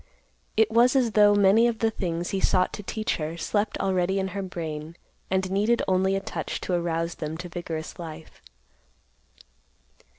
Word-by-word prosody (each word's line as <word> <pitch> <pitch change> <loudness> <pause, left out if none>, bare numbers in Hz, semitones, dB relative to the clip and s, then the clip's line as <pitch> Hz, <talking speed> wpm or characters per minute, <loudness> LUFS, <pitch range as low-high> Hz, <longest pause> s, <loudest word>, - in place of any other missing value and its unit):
It 220 0 +4
was 240 +3 +4
as 250 -4 +3
though 205 -1 +5
many 205 +4 +5
of 235 -2 -1
the 225 0 +1
things 175 -4 -3
he 195 - -1
sought 185 -1 +2
to - - -5
teach 215 +2 -2
her 160 +1 -4
slept 205 +4 -1
already 190 0 0
in 190 0 -1
her 200 +1 -4
brain, 160 -4 -6 0.3
and 190 0 0
needed 210 +5 +2
only 190 +1 +2
a - - +1
touch 195 - -4
to 185 - -3
arouse 170 -1 -1
them 155 0 -5
to 180 +2 -6
vigorous 165 -2 -6
life. 160 -1 -9
190 Hz, 170 wpm, -26 LUFS, 170-205 Hz, 0.3 s, though